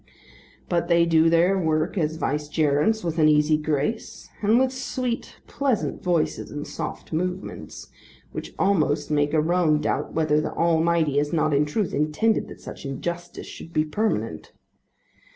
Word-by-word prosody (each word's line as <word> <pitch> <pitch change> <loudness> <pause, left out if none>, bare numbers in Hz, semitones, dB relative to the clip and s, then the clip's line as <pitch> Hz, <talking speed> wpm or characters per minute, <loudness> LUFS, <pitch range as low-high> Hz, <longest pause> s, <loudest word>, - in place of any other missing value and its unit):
But 170 -1 0
they 170 -1 +4
do 165 -1 +4
their 175 +4 +3
work 160 0 0
as 160 -4 0
vicegerents 150 +6 0
with 165 -1 -2
an 155 -1 +6
easy 150 +1 +4
grace, 150 +7 -2
and 215 +2 +4
with 260 0 +2
sweet 255 -2 -3
pleasant 270 -6 -1
voices 175 -3 0
and 145 0 -5
soft - - -6
movements, 180 +3 -4 0.4
which - - -7
almost 155 -6 +1
make 145 -1 +2
a 155 -1 +2
man 165 -2 +2
doubt - - -2
whether 155 -1 +2
the - - -4
Almighty 165 -3 +2
has 145 0 -1
not 155 -2 +1
in 145 +1 +3
truth 195 +6 -1
intended 155 +10 +1
that - - -12
such - - -9
injustice 170 +6 -5
should 165 - -10
be 155 - +2
permanent. 210 +8 -2
160 Hz, 150 wpm, -24 LUFS, 150-180 Hz, 0.4 s, an